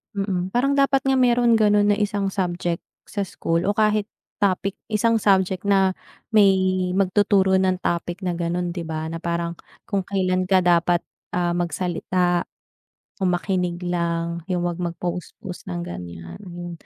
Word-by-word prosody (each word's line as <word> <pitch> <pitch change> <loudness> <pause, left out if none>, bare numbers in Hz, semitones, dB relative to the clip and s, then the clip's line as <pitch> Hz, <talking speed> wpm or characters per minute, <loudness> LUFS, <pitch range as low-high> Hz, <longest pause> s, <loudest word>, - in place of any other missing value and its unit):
mm. 195 -2 -1
Parang 275 +3 +2
dapat 275 -1 +3
nga 270 -1 +2
meron 240 -2 +4
ganun 205 -1 +4
na 205 - +2
isang 200 -1 0
subject 175 -2 -1 0.2
sa 200 -2 -4
school 165 +1 -1
o 205 - +1
kahit 215 -1 +2 0.3
topic, 195 -1 +1
isang 225 +1 +2
subject 190 -3 +2
na 195 -1 +4 0.4
may 200 -3 +6 0.4
magtuturo 195 0 +3
ng 185 -1 +1
topic 175 +1 -1
na 180 - 0
gano'n, 175 +1 -1
'di 175 - -3
ba, 160 0 -3
na 165 - -4
parang 170 0 -2 0.3
kung 195 -2 0
kailan 185 -2 +1
ka 190 0 +5
dapat, 175 0 +3 0.3
ah, 175 -1 +1
magsalita 175 +1 0 0.8
o 190 - +2
makinig 180 0 -1
lang, 170 -1 -1
yung 180 -1 0
wag 175 -1 -2
mag-post 175 0 -4
post 180 -2 -8
ng 85 -1 -3
gan'yan 85 -1 -8
yun. 175 -1 -7
180 Hz, 155 wpm, -23 LUFS, 175-200 Hz, 0.8 s, may